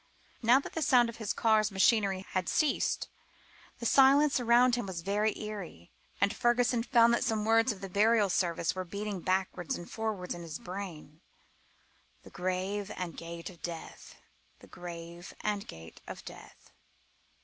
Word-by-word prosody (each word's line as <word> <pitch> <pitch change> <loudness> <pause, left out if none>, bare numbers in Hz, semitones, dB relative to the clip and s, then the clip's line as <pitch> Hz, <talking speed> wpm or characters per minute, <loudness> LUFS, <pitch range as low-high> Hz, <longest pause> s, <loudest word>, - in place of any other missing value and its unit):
Now 240 +3 +5
that - - -8
the 325 - -3
sound 250 -5 +4
of 230 - -8
his 220 -3 -3
car's 215 -1 +2
machinery 195 -1 +2
had 185 -2 -1
ceased, 305 -2 +1 0.7
the 235 - -7
silence 275 +3 +5
around 245 +1 +4
him 240 -4 -1
was 180 -3 -5
very 205 +4 0
eerie, 195 - -7 0.3
and 200 +1 +2
Fergusson 240 0 +2
found 235 -1 +4
that 235 - +1
some 220 -2 0
words 225 +2 +4
of 200 -3 -8
the 195 - -5
burial 210 +2 +3
service 170 -3 0
were 185 - -4
beating 200 +2 -5
backwards 185 -1 -1
and 175 - -9
forwards 215 -5 -3
in 175 - -8
his 165 -2 -6
brain 175 -5 -8 1.0
"The - - -14
grave 190 +3 -2
and 180 -2 -5
gate 170 +2 -7
of 175 - -18
death... 170 -2 -8 0.4
The - - -16
grave 170 0 -9
and 205 -1 -2
gate 80 0 -11
of - - -8
death." - - -13
200 Hz, 160 wpm, -30 LUFS, 180-230 Hz, 1.0 s, Now